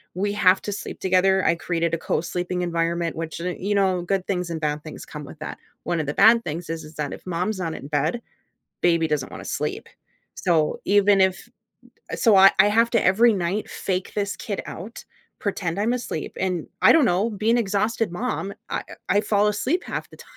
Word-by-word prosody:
we 200 +2 -1
have 190 -2 +4
to 205 - -3
sleep - - -7
together, 190 0 +3
I - - +4
created 170 0 -1
a 165 - +2
co-sleeping 180 +1 -2
environment 170 0 -1
which, 165 0 -5
y 180 +1 -3
you 205 +2 -1
know, 190 -2 +2
good 190 +1 -1
things 180 -3 -1
and 165 -1 -4
bad 150 0 -1
things 155 - -9
come 150 -1 -8
with 150 - -12
that, 155 - -6 0.3
one 170 -1 -1
of - - -4
the 145 - -1
bad 230 +3 +6
things 165 +1 -5
is 165 0 -4
is 155 +1 -13
that 145 -1 -3
if - - -11
mom's 185 +3 -2
not 165 -3 -2
in 140 - -8
bed, 150 +11 0 0.6
baby 170 -2 +3
doesn't 150 -4 -1
wanna - - -8
sleep, - - -3 0.5
so, 160 -4 +1
even 205 0 +4
if 190 0 0 0.7
so 220 -4 +4
I 195 +1 +8
I - - +7
have 230 +3 +3
to 230 -3 +2
every 225 +6 +5
night 185 +3 -2
fake 185 -1 -3
this 200 -1 -2
kid 200 -3 -4
out, 205 +8 -8 0.4
pretend 195 -3 -2
I'm 225 +3 +1
asleep, 235 -10 -5
and 180 -4 -1 0.2
I - - +8
don't 315 -5 +5
know, 200 +3 +1
be 215 +1 -1
an 235 - +4
exhausted 210 -1 0
mom, 200 -1 -3 0.2
I - - -2 0.3
I 195 - +2
I - - +5
fall 210 -1 +2
asleep 265 - 0
half - - -5
the - - -15
time, - - -16
185 Hz, 210 wpm, -23 LUFS, 170-205 Hz, 0.7 s, I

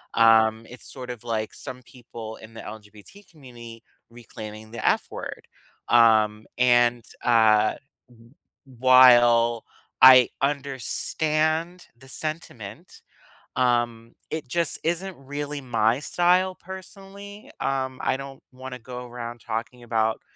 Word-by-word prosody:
Um, 110 0 +4
it's 125 - -11
sort 125 -2 -7
of, 120 -1 -10
like, 110 -2 -3
some 130 -2 -8
people 115 -3 -10
in 110 +1 -14
the - - -8
LGBT 105 - -13
community 120 -6 -13 0.3
reclaiming 110 -2 -11
the 120 - -7
F - - +2
word, - - -8 0.4
um, 110 -2 +4
and, 120 -1 +3 0.2
uh, 110 -2 +4 0.3
w 115 0 -20 0.3
while 120 -2 +5 0.4
I 130 -1 +9
understand 155 +5 -1
the 135 +2 -17
sentiment, 155 - -7 0.6
um, 120 -2 0 0.2
it 155 -3 -5
just 165 +4 -1
isn't 175 +3 -2
really 145 +1 -6
my 115 0 +1
style 180 +3 +1
personally? 195 +2 -11
Um, 130 -1 -2
I - - +1
don't 135 0 -10
wanna 130 0 -9
go 125 +1 -8
around 120 -1 -8
talking 115 +2 -5
about 110 -1 -1
125 Hz, 120 wpm, -24 LUFS, 115-140 Hz, 0.6 s, I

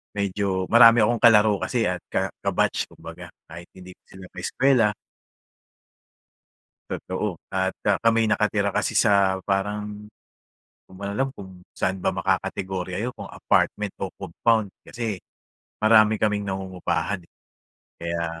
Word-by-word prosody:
medyo 100 -1 -1
marami 115 0 +8
akong 115 +1 +1
kalaro 105 -3 +5
kasi 120 -3 0
at 90 0 -2
ka - - -1
ka-batch - - 0
kumbaga, - - -11 0.2
kahit 85 +2 -10
hindi 95 0 -12
ko - - -66
sila 95 0 -12
kaeskuwela. 115 +4 +2 2.0
Totoo - - -3 0.2
at 95 0 -1
ah, 100 -2 +2
kami'y 115 -1 +2
nakatira 105 -1 +1
kasi - - -1
sa 95 -2 +3
parang, 105 +1 -3
di 105 - -29 0.6
ko - - -33
nga 100 +1 -5
alam 135 +7 -1
kung 95 -1 -10 0.2
saan 95 +1 -1
ba - - -1
makakategorya 95 0 -2
'yun 125 - -2
kung - - -7
apartment 105 -2 0
o 95 -2 -5
compound. 100 +3 0 0.2
Kasi 115 -5 -4 0.6
marami 110 0 +5
kaming 105 -1 0
nangungupahan, 95 0 -3 0.8
kaya 85 -1 -3
100 Hz, 130 wpm, -24 LUFS, 95-110 Hz, 2.0 s, marami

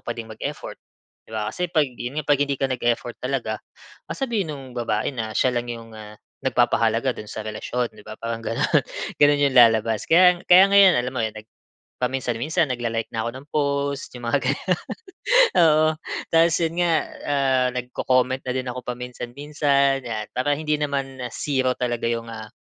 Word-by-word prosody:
pa 120 - -2
din 115 -1 -7
mag-effort, 110 - -6 0.5
'di - - -17
ba? 105 0 -2
Kasi 180 +7 -2
'pag 155 -4 +3
'yon 125 +4 -6
nga, 150 - -10
'pag 145 -1 +3
hindi 140 -1 -1
ka 135 - +2
nag-effort 120 -1 -1
talaga, 125 -4 -2 0.5
sasabihin 225 - -2
nung 140 -2 -8
babae 115 -1 -1
na 110 -3 -4
siya 130 - +3
lang 120 0 -2
'yong 115 -1 -8
ah, 105 0 -11 0.3
nagpapahalaga 120 -1 +2
do'n 105 - -8
sa 110 - -5
relasyon, 115 +3 -3
'di 105 -1 -15
ba? 110 0 -8
Parang 115 0 -3
gano'n. 115 - +1 0.4
Gano'n 145 0 +5
'yong 130 - -5
lalabas. 115 -2 +5
Kaya 180 +1 +6
kaya 185 +2 +8
ngayon 200 -2 +7
alam 125 +1 -2
mo 130 - -1
nag 110 -1 -4 0.6
paminsan-minsan 130 +5 0
nagla-like 115 -2 -2
na 110 0 -1
ako - - -1
ng 135 +2 -10
post 140 -1 -1
'yung 120 -1 -7
mga 140 +4 +2
gano'n. 135 - 0 1.0
Oo. 155 -1 +5 0.4
Tapos 165 0 +5
yun 165 +1 -3
nga, 170 -2 +3 0.3
ah, 135 -3 +2
nagco-comment 130 +1 0
na 125 - -1
din 130 0 -3
ako 125 - -6
paminsan-minsan, 135 +3 -1
'yan. 110 -2 -4
Para 145 +3 +1
hindi 150 -1 0
naman 135 -2 -3
ah, - - -3
0 130 -3 0
talaga 120 -2 -1
'yung 115 0 -3
ah, 110 -1 -8
130 Hz, 180 wpm, -23 LUFS, 115-145 Hz, 1.0 s, kaya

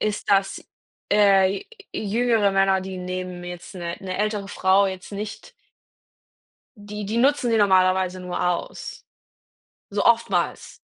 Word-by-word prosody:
ist, 210 -1 -2
dass, 195 -1 +1 0.5
äh, 195 -2 +4
j - - -12 0.3
jüngere 220 0 +1
Männer, 195 0 +3
die 190 0 -6
nehmen 180 0 -5
jetzt 175 +1 -9
'ne 170 -1 -4
'ne 185 -1 -5
ältere 210 -1 -1
Frau 195 0 +3
jetzt 190 +1 -8
nicht 210 - -7 1.3
die 205 0 -7
die 215 +4 -2
nutzen 265 0 +3
sie 225 - +3
normalerweise 185 -2 +3
nur 180 -1 -5
aus, 175 -1 -4 0.9
so - - -1
oftmals. - - +1
195 Hz, 130 wpm, -23 LUFS, 185-210 Hz, 1.3 s, äh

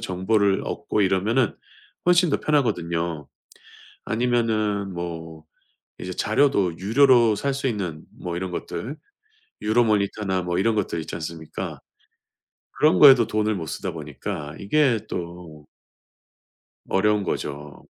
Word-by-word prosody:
정보를 95 +2 +1
얻고 105 - -1
이러면은 100 +5 +1 0.5
훨씬 180 -1 +4
더 - - 0
편하거든요. 85 - -1 0.8
아니면은 110 -4 0
뭐 80 -2 -6 0.6
이제 90 - -6
자료도 100 - +1
유료로 120 +2 +4
살 140 +5 -1
수 135 0 -3
있는 90 -9 -4 0.2
뭐 85 -1 -4
이런 95 +1 -3
것들 125 +9 -5 0.7
유로모니터나 105 -4 +1
뭐 90 0 -2
이런 115 +3 +2
것들 95 -4 -1
있지 80 - -7
않습니까? 80 -1 -6 1.0
그런 155 +1 +4
거에도 135 -5 +8
돈을 110 -1 0
못 85 -4 -4
쓰다 95 +4 -4
보니까 75 +1 -6
이게 120 +3 +2
또 85 -4 -7 1.2
어려운 105 +1 +2
거죠. 75 -4 -5
100 Hz, 255 characters per minute, -24 LUFS, 85-115 Hz, 1.2 s, 거에도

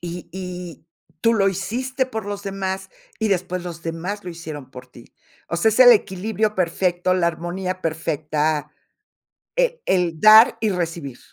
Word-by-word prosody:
Y 175 0 -7
y 180 -3 -7 0.3
tú 230 0 +3
lo 195 -2 +3
hiciste 255 +7 -2
por 220 -5 -5
los 205 0 -5
demás, 190 -1 -4 0.3
y 220 - 0
después 185 -2 -1
los 170 -2 -7
demás 170 +5 -4
lo 180 - -5
hicieron 155 -5 -8
por 125 - -11
ti. - - -17 0.4
O 170 - -2
sea, 220 +6 +3
es 220 - 0
el 245 -1 +10
equilibrio 215 +1 0
perfecto, 180 0 0
la 180 -2 +2
armonía 180 +3 -4
perfecta, 155 -1 -1 0.9
eh, - - +1
el 175 -4 +1
dar 215 +2 +8
y 220 -2 +1
recibir. 165 -7 -4
185 Hz, 160 wpm, -22 LUFS, 170-205 Hz, 0.9 s, el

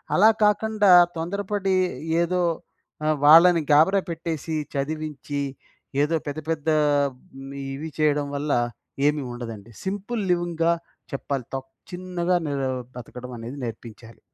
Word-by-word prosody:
అలా 210 +4 +7
కాకండా, 210 -1 +3 0.3
తొందరపడి 195 +2 -1 0.5
ఏదో 180 +1 0 0.6
ఆహ్, 155 0 +2
వాళ్ళని 165 +2 +8
గాబరా 165 +7 +5
పెట్టేసి, 160 -1 -4 0.2
చదివించి, 145 0 -3 0.6
ఏదో 150 +3 +2
పెద్ద 145 +2 -3
పెద్ద 160 -1 -1 0.8
మ్ 140 - -8 0.2
ఇవి 155 +4 -5
చేయడం 145 -1 +2
వల్ల 145 +1 -2 0.6
ఏమీ 150 0 +1
ఉండదండి. 115 -3 -8
సింపుల్ 205 +4 -3
లివింగ్గా 170 -1 +1 0.4
చెప్పాలి. 135 -2 -3
తప్ 135 0 -6 0.2
చిన్నగా 180 0 -1
నెరు 135 -2 -1 0.3
బతకడం 125 +1 -9
అనేది 120 +5 -7
నేర్పించాలి. 115 -1 -8
155 Hz, 115 wpm, -24 LUFS, 140-180 Hz, 0.8 s, వాళ్ళని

